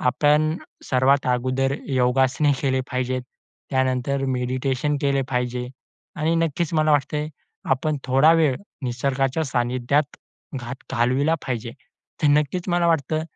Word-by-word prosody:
आपण 150 Hz, +4 st, +2 dB, 0.3 s
सर्वात 135 Hz, +1 st, +2 dB
अगोदर 130 Hz, +2 st, 0 dB
योगासने 130 Hz, +2 st, +2 dB
केले 130 Hz, -1 st, +1 dB
पाहिजेत. 130 Hz, 0 st, -1 dB, 0.5 s
त्यानंतर 130 Hz, +1 st, 0 dB
मेडिटेशन 130 Hz, +3 st, -1 dB
केले 140 Hz, -1 st, +2 dB
पाहिजे. 125 Hz, -1 st, -2 dB, 0.5 s
आणि 160 Hz, +2 st, +1 dB
नक्कीच 165 Hz, 0 st, 0 dB
मला 155 Hz, 0 st, +3 dB
वाटतं, 150 Hz, +1 st, 0 dB, 0.4 s
आपण 145 Hz, +3 st, +1 dB
थोडा 135 Hz, +5 st, +5 dB
वेळ 150 Hz, -5 st, +3 dB, 0.3 s
निसर्गाच्या 135 Hz, +3 st, -1 dB
सानिध्यात 130 Hz, +2 st, 0 dB, 0.4 s
घात, 120 Hz, +1 st, -6 dB, 0.2 s
घालविला 130 Hz, +6 st, +2 dB
पाहिजे. 120 Hz, -2 st, -3 dB, 0.5 s
तर -, -, +4 dB
नक्कीच 150 Hz, +5 st, +1 dB
मला 175 Hz, -1 st, +2 dB
वाटतं, 155 Hz, -1 st, +1 dB
135 Hz, 115 wpm, -23 LUFS, 125-150 Hz, 0.5 s, थोडा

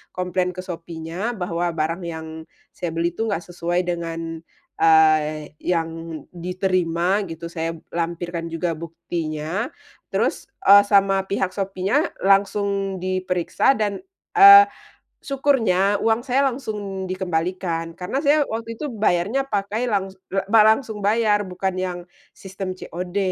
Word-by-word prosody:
komplain 180 Hz, 0 st, -1 dB
ke 185 Hz, -, -5 dB
Shopee-nya 170 Hz, +5 st, -5 dB
bahwa 175 Hz, -2 st, -2 dB
barang 165 Hz, +3 st, -1 dB
yang 160 Hz, -1 st, -5 dB, 0.5 s
saya 175 Hz, -, -4 dB
beli 170 Hz, +1 st, 0 dB
itu 225 Hz, +6 st, -3 dB
ga 190 Hz, -5 st, -2 dB
sesuai 175 Hz, 0 st, -2 dB
dengan, 165 Hz, -2 st, -4 dB, 0.4 s
eee, 155 Hz, -2 st, +4 dB
yang 165 Hz, -2 st, -3 dB
diterima 180 Hz, +1 st, 0 dB
gitu. 165 Hz, 0 st, -7 dB
Saya 165 Hz, 0 st, -3 dB, 0.2 s
lampirkan 170 Hz, 0 st, -3 dB
juga 165 Hz, +1 st, -2 dB
buktinya 165 Hz, +3 st, -4 dB, 0.5 s
terus, -, -, 0 dB, 0.2 s
eee, 200 Hz, +1 st, +9 dB
sama 195 Hz, -1 st, +3 dB
pihak 190 Hz, -1 st, -1 dB
Shopee-nya 195 Hz, -, -1 dB
langsung 195 Hz, -1 st, +1 dB
diperiksa 185 Hz, +4 st, +1 dB
dan, 205 Hz, -3 st, -1 dB, 0.3 s
eee, 400 Hz, -1 st, +10 dB, 0.6 s
syukurnya 225 Hz, -9 st, +2 dB
uang 225 Hz, +2 st, +2 dB
saya 270 Hz, +2 st, +1 dB
langsung 205 Hz, -7 st, -4 dB
dikembalikan. 170 Hz, -2 st, -2 dB
Karena 225 Hz, +10 st, -2 dB
saya 295 Hz, 0 st, +3 dB
waktu 230 Hz, 0 st, -5 dB
itu 300 Hz, -, -4 dB
bayarnya 205 Hz, +4 st, +1 dB
pakai 205 Hz, +2 st, -1 dB
langs 195 Hz, -3 st, -1 dB, 0.2 s
ba 195 Hz, +3 st, +3 dB
langsung 220 Hz, -1 st, +2 dB
bayar, 210 Hz, 0 st, +2 dB
bukan 185 Hz, +1 st, -2 dB
yang 185 Hz, -1 st, -3 dB, 0.4 s
sistem 190 Hz, -1 st, -6 dB
COD. 180 Hz, +2 st, -6 dB
185 Hz, 125 wpm, -22 LUFS, 170-205 Hz, 0.6 s, eee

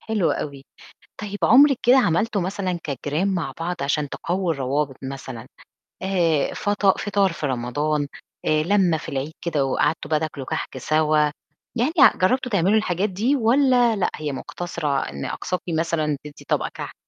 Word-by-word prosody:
حلو 215 Hz, -6 st, 0 dB
أوي. 140 Hz, -2 st, -5 dB, 0.6 s
طيب 205 Hz, -1 st, -5 dB
عمرِك 275 Hz, +2 st, +6 dB
كده 250 Hz, +2 st, +6 dB
عملتوا 205 Hz, +1 st, +1 dB
مثلًا 185 Hz, -1 st, -2 dB
كجيران 150 Hz, +7 st, -1 dB
مع 160 Hz, -6 st, -2 dB
بعض 175 Hz, +1 st, -2 dB
عشان 145 Hz, +1 st, 0 dB
تقووا 175 Hz, +4 st, -2 dB
الروابط 140 Hz, -1 st, -1 dB
مثلًا، 130 Hz, -3 st, -7 dB, 0.6 s
آآ 170 Hz, -6 st, +1 dB
فَطا 205 Hz, -1 st, +2 dB
فطار 200 Hz, -2 st, +1 dB
في 155 Hz, -, -4 dB
رمضان، 145 Hz, +4 st, -1 dB, 0.4 s
آآ 155 Hz, 0 st, +2 dB
لمة 180 Hz, -2 st, +3 dB
في 155 Hz, -, -8 dB
العيد 140 Hz, +3 st, -3 dB
كده 150 Hz, -5 st, 0 dB
وقعدتوا 155 Hz, +4 st, 0 dB
بقى 155 Hz, -, +3 dB
تاكلوا 150 Hz, -4 st, -5 dB
كحك -, -, -4 dB
سوا؟ 155 Hz, +3 st, +2 dB, 0.6 s
يعني 245 Hz, +5 st, +1 dB
ع -, -, +7 dB
جربتوا 250 Hz, +6 st, +1 dB
تعملوا 200 Hz, +2 st, +3 dB
الحاجات 195 Hz, -1 st, 0 dB
دي 225 Hz, +10 st, +1 dB
والّا 245 Hz, -1 st, +3 dB
لأ 200 Hz, -, 0 dB
هي 150 Hz, -2 st, -4 dB
مقتصرة 150 Hz, 0 st, -3 dB
إن 70 Hz, 0 st, -6 dB
أقصاكِ 180 Hz, -, -3 dB
مثلًا 160 Hz, -2 st, 0 dB
تدّي 150 Hz, -1 st, -12 dB
طبق -, -, +1 dB
كحك؟ -, -, -7 dB
170 Hz, 160 wpm, -23 LUFS, 145-200 Hz, 0.6 s, ع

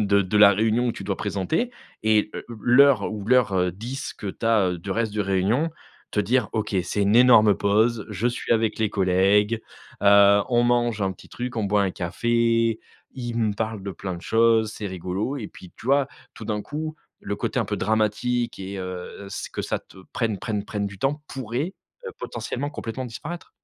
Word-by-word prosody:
de 100 Hz, -1 st, +3 dB
de 95 Hz, +3 st, -1 dB
la 100 Hz, -1 st, +8 dB
réunion 115 Hz, +4 st, +1 dB
que -, -, -8 dB
tu 100 Hz, -, -7 dB
dois 100 Hz, -1 st, -2 dB
présenter. 100 Hz, -, -1 dB, 0.3 s
Et 110 Hz, -1 st, +3 dB
heu, -, -, -6 dB, 0.2 s
l'heure 125 Hz, -3 st, +5 dB
ou 105 Hz, -2 st, -6 dB
l'heure, 125 Hz, -3 st, +4 dB
heu, 90 Hz, -1 st, +2 dB
10 120 Hz, +9 st, -6 dB
que 105 Hz, -, -8 dB
tu 115 Hz, -, -4 dB
as 100 Hz, -5 st, +3 dB
du 95 Hz, +4 st, -7 dB
reste 110 Hz, +1 st, 0 dB
de 105 Hz, -, -2 dB
réunion, 100 Hz, -, +1 dB, 0.4 s
te 105 Hz, -, +1 dB
dire: 115 Hz, +2 st, +1 dB
«OK, 110 Hz, -2 st, -2 dB
c'est 105 Hz, -, -1 dB
une 100 Hz, +2 st, +2 dB
énorme 110 Hz, -5 st, +7 dB
pause, 110 Hz, +3 st, +1 dB
je 105 Hz, +2 st, -2 dB
suis 120 Hz, -, -3 dB
avec 115 Hz, -1 st, +2 dB
les 110 Hz, -1 st, +2 dB
collègues, 100 Hz, +3 st, +2 dB, 0.4 s
heu, 100 Hz, 0 st, +7 dB
on 120 Hz, -1 st, +3 dB
mange 120 Hz, -3 st, +1 dB
un 95 Hz, -1 st, 0 dB
petit -, -, -16 dB
truc, 125 Hz, -1 st, -5 dB
on 110 Hz, -, 0 dB
boit 100 Hz, 0 st, +2 dB
un 95 Hz, -, 0 dB
café, 115 Hz, +5 st, +1 dB, 0.3 s
ils 120 Hz, -2 st, -5 dB
me 110 Hz, -2 st, +1 dB
parlent 110 Hz, -2 st, -3 dB
de 100 Hz, -, -4 dB
plein 95 Hz, 0 st, -5 dB
de 85 Hz, -, -9 dB
choses, 115 Hz, -1 st, +3 dB
c'est 105 Hz, -, -5 dB
rigolo» 95 Hz, +8 st, -3 dB
et 110 Hz, -6 st, -6 dB
puis, 90 Hz, -, -14 dB
tu -, -, -14 dB
vois, 140 Hz, +1 st, +3 dB, 0.2 s
tout 110 Hz, -, -10 dB
d'un 105 Hz, -1 st, -2 dB
coup, 155 Hz, +6 st, -5 dB, 0.3 s
le -, -, -4 dB
côté -, -, -2 dB
un -, -, 0 dB
peu -, -, -2 dB
dramatique 110 Hz, +3 st, 0 dB
et 95 Hz, +1 st, -6 dB
heu, 95 Hz, +1 st, -7 dB
ce -, -, -6 dB
que -, -, -4 dB
ça -, -, -2 dB
te -, -, -19 dB, 0.2 s
prenne 110 Hz, -4 st, -1 dB
prenne 105 Hz, +1 st, -3 dB
prenne 100 Hz, -2 st, -3 dB
du 95 Hz, -1 st, -9 dB
temps 145 Hz, +6 st, 0 dB
pourrait, 135 Hz, -, -4 dB, 0.3 s
heu, -, -, -4 dB
potentiellement 125 Hz, +5 st, -4 dB
complètement 130 Hz, -1 st, -5 dB
disparaître. 165 Hz, +9 st, -7 dB
110 Hz, 205 wpm, -24 LUFS, 100-120 Hz, 0.4 s, la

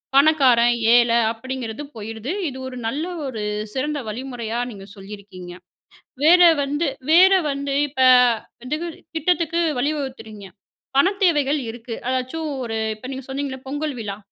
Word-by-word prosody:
பணக்காரன் 265 Hz, -5 st, +5 dB, 0.2 s
ஏழை 235 Hz, -1 st, +4 dB
அப்படிங்குறது 250 Hz, +1 st, -6 dB
போயிருது. 220 Hz, +5 st, -6 dB, 0.2 s
இது 260 Hz, -, -9 dB
ஒரு 255 Hz, -, -8 dB
நல்ல 285 Hz, +8 st, -2 dB, 0.2 s
ஒரு 245 Hz, -5 st, -5 dB, 0.3 s
சிறந்த 290 Hz, +2 st, -2 dB
வழிமுறையா 240 Hz, -1 st, -4 dB
நீங்க 195 Hz, -2 st, -10 dB
சொல்லியிருக்கீங்க. 195 Hz, -2 st, -10 dB, 0.7 s
வேற 350 Hz, +4 st, +7 dB, 0.2 s
வந்து 290 Hz, +4 st, -1 dB, 0.3 s
வேற 370 Hz, +4 st, +7 dB, 0.2 s
வந்து 280 Hz, 0 st, -3 dB
இப்ப 270 Hz, -1 st, -10 dB, 0.6 s
வந்து 285 Hz, +5 st, -2 dB, 0.4 s
திட்டத்துக்கு 335 Hz, +1 st, 0 dB, 0.2 s
வழிவகுக்குறீங்க, 255 Hz, -8 st, -4 dB, 0.5 s
பணத் 385 Hz, +8 st, +3 dB
தேவைகள் 295 Hz, -4 st, +2 dB
இருக்கு 230 Hz, +1 st, -7 dB
அதாச்சும் 260 Hz, +5 st, -2 dB, 0.2 s
ஒரு 225 Hz, -1 st, -3 dB, 0.2 s
இப்ப 235 Hz, +4 st, -10 dB
நீங்க 265 Hz, -1 st, -7 dB
சொன்னிங்கல்ள 270 Hz, -1 st, -4 dB
பொங்கல் 290 Hz, 0 st, -3 dB
விழா. 200 Hz, -2 st, -5 dB
260 Hz, 125 wpm, -22 LUFS, 230-295 Hz, 0.7 s, வேற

